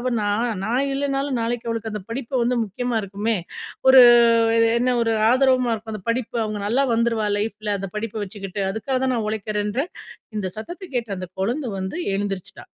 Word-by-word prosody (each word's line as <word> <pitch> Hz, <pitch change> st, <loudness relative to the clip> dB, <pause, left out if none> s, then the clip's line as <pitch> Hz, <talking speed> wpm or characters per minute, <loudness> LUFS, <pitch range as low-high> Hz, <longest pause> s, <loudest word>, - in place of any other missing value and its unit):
அவ 255 Hz, +1 st, -1 dB
நான் 215 Hz, +4 st, 0 dB
நான் 255 Hz, +5 st, +1 dB
இல்லைனாலும் 275 Hz, -1 st, -1 dB
நாளைக்கு 235 Hz, 0 st, -2 dB
அவளுக்கு 225 Hz, -1 st, -3 dB
அந்த 210 Hz, -, -5 dB
படிப்பு 260 Hz, +2 st, -5 dB
வந்து 245 Hz, 0 st, +1 dB
முக்கியமா 240 Hz, +3 st, -2 dB
இருக்குமே. 205 Hz, +3 st, -1 dB, 0.5 s
ஒரு 260 Hz, -1 st, +10 dB, 0.8 s
என்ன 250 Hz, 0 st, +1 dB
ஒரு 225 Hz, -1 st, +1 dB, 0.2 s
ஆதரவா 255 Hz, -2 st, +3 dB
இருக்கும். 220 Hz, 0 st, -7 dB
அந்த 190 Hz, -, -8 dB
படிப்பு 240 Hz, 0 st, -2 dB
அவங்க 210 Hz, -1 st, -4 dB
நல்லா 260 Hz, +6 st, +2 dB
வந்துருவா 225 Hz, -2 st, +1 dB
லைஃப்ல, 210 Hz, 0 st, -3 dB
அந்த 195 Hz, -2 st, -5 dB
படிப்பை 215 Hz, 0 st, -3 dB
வச்சுக்கிட்டு. 195 Hz, 0 st, -6 dB
அதுக்காக 255 Hz, +5 st, -2 dB
தான் 260 Hz, -, +1 dB
நான் 220 Hz, -, -1 dB
உழைக்கிறேன்றேன். 215 Hz, -, -2 dB, 0.4 s
இந்த 200 Hz, -3 st, -2 dB
சத்தத்த 345 Hz, -, -7 dB
கேட்ட 230 Hz, -3 st, -2 dB
அந்த 185 Hz, -, -5 dB
குழந்தை 245 Hz, +6 st, -1 dB
வந்து 190 Hz, -, -4 dB, 0.2 s
எழுந்திரிச்சுட்டா. 195 Hz, -2 st, -4 dB
230 Hz, 170 wpm, -22 LUFS, 210-255 Hz, 0.8 s, ஒரு